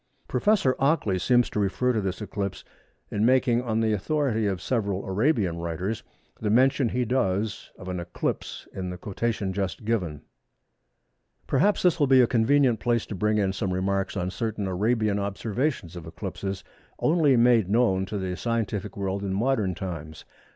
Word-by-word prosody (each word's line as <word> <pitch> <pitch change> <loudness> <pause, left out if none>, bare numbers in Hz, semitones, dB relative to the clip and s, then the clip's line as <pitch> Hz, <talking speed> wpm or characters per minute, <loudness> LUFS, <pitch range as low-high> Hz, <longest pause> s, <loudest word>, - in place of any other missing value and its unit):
Prof. 215 -5 +2
Ockley 135 - +2
seems 120 +4 +3
to - - -2
refer 115 +6 +1
to 110 - 0
this 95 +2 -3
eclipse 100 -2 -4 0.5
in 105 - 0
making, 125 0 +3
on 115 -2 -1
the 110 -1 +2
authority 110 0 0
of 95 -3 -1
several 100 -5 -1
Arabian 100 - +1
writers, 85 +6 -3 0.4
the 105 - -1
mention 130 +2 +3
he 125 +1 0
does 110 -4 -1
of 95 - -10
an 90 -1 -3
eclipse 85 - -4
in 95 -1 -4
the 90 - -5
quotation 100 0 -2
just 100 +3 -3
given. 90 -10 -1 1.2
Perhaps 205 +1 +2
this 175 -2 +3
will 145 - +4
be 130 -1 +6
a - - +6
convenient 125 0 +3
place 115 +2 +1
to - - -7
bring 105 +2 +1
in 95 -2 +1
some 95 -1 -2
remarks 95 +2 -1
on 90 -1 -1
certain 110 -2 -3
Arabian 105 +2 +1
observations 100 - -2
of 85 -2 -8
eclipses 95 +3 -5 0.3
only 150 -5 +3
made 115 -5 +4
known 105 -4 +3
to 105 - -3
the 95 -2 -3
scientific 110 -3 -2
world 100 0 -2
in 100 -1 -3
modern 110 -4 +1
times. 80 -4 -6
105 Hz, 165 wpm, -26 LUFS, 95-120 Hz, 1.2 s, be